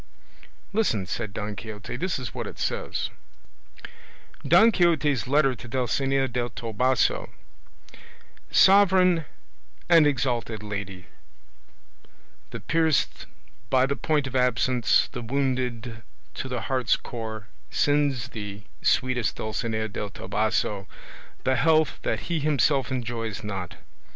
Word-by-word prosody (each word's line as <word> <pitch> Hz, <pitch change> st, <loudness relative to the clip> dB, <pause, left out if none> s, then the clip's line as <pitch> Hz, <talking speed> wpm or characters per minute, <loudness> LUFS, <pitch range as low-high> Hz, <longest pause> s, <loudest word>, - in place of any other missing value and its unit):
"Listen," 155 Hz, -, +1 dB
said 100 Hz, +2 st, -4 dB
Don 105 Hz, +1 st, -5 dB
Quixote, 105 Hz, 0 st, -7 dB
"this 185 Hz, -1 st, -1 dB
is 130 Hz, -3 st, -6 dB
what -, -, -4 dB
it -, -, -9 dB
says: -, -, -2 dB, 1.3 s
"DON 215 Hz, +7 st, +6 dB
QUIXOTE'S 155 Hz, -, +2 dB
LETTER 140 Hz, -1 st, +3 dB
TO 120 Hz, -, -11 dB
DULCINEA 135 Hz, +3 st, 0 dB
DEL 120 Hz, -1 st, -2 dB
TOBOSO 120 Hz, +3 st, 0 dB, 1.2 s
"Sovereign 185 Hz, -4 st, +5 dB, 0.6 s
and 165 Hz, -3 st, +6 dB
exalted 120 Hz, -6 st, -1 dB
Lady, 100 Hz, -3 st, -6 dB, 1.4 s
The -, -, -6 dB
pierced 160 Hz, -3 st, +1 dB, 0.4 s
by 130 Hz, 0 st, +4 dB
the 140 Hz, +1 st, -1 dB
point 150 Hz, -2 st, 0 dB
of 130 Hz, -1 st, -6 dB
absence, 125 Hz, -1 st, +2 dB
the 125 Hz, -, -6 dB
wounded 125 Hz, -2 st, -2 dB, 0.3 s
to -, -, -5 dB
the 125 Hz, -1 st, -3 dB
heart's 130 Hz, -3 st, +1 dB
core, 110 Hz, -3 st, -6 dB, 0.2 s
sends 145 Hz, -4 st, +1 dB
thee, 105 Hz, -1 st, -7 dB, 0.2 s
sweetest 125 Hz, -4 st, +1 dB
Dulcinea 110 Hz, 0 st, -2 dB
del 105 Hz, 0 st, -5 dB
Toboso, 105 Hz, 0 st, -1 dB, 0.6 s
the 130 Hz, 0 st, +2 dB
health 155 Hz, +3 st, +3 dB
that -, -, -1 dB
he 170 Hz, -2 st, -2 dB
himself 140 Hz, -2 st, +2 dB
enjoys 115 Hz, -4 st, -4 dB
not. 95 Hz, -4 st, -5 dB
125 Hz, 115 wpm, -26 LUFS, 110-145 Hz, 1.4 s, DON